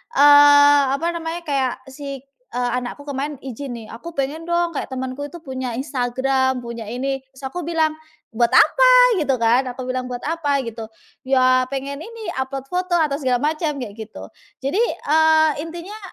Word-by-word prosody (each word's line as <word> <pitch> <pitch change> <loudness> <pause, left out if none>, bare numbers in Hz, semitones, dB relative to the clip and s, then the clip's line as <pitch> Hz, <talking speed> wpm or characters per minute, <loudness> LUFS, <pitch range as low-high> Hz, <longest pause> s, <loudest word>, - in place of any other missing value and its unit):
eee, 290 0 +7
apa 330 +4 -2
namanya, 335 0 -5
kayak 265 -3 -1
si 275 -1 -7 0.2
eee, 245 0 -2
anakku 250 +3 -7
kemarin 285 +1 -4
izin 265 0 -6
nih, 225 -2 -9
"Aku 335 +9 -9
pengen 295 +5 -3
dong 345 0 +1
kayak 290 - -4
temanku 260 +2 -5
itu 345 - -14
punya 260 -3 -4
Instagram, 260 0 -1
punya 235 -2 -7
ini." 270 +3 -2 0.2
Terus 265 - -15
aku 355 - -5
bilang, 320 -2 +1 0.4
"Buat 235 +1 +1
apa?" - - +6
gitu 275 -4 +1
kan, 240 +3 +2
aku 250 +1 -6
bilang, 255 0 -3
"Buat 245 -1 -6
apa?" 290 -3 0
gitu. 225 -2 -7 0.4
"Ya, 255 -1 +3
pengen 275 +1 -5
ini 450 +4 -7
upload 265 0 -3
foto 360 0 0
atau 300 -3 +1
segala 255 -1 0
macam," 315 -2 -2
kayak 210 0 -9
gitu. 220 0 -9 0.3
Jadi, 280 +10 0
eee, 315 -7 +3
intinya 345 +7 -7
275 Hz, 165 wpm, -21 LUFS, 255-315 Hz, 0.4 s, eee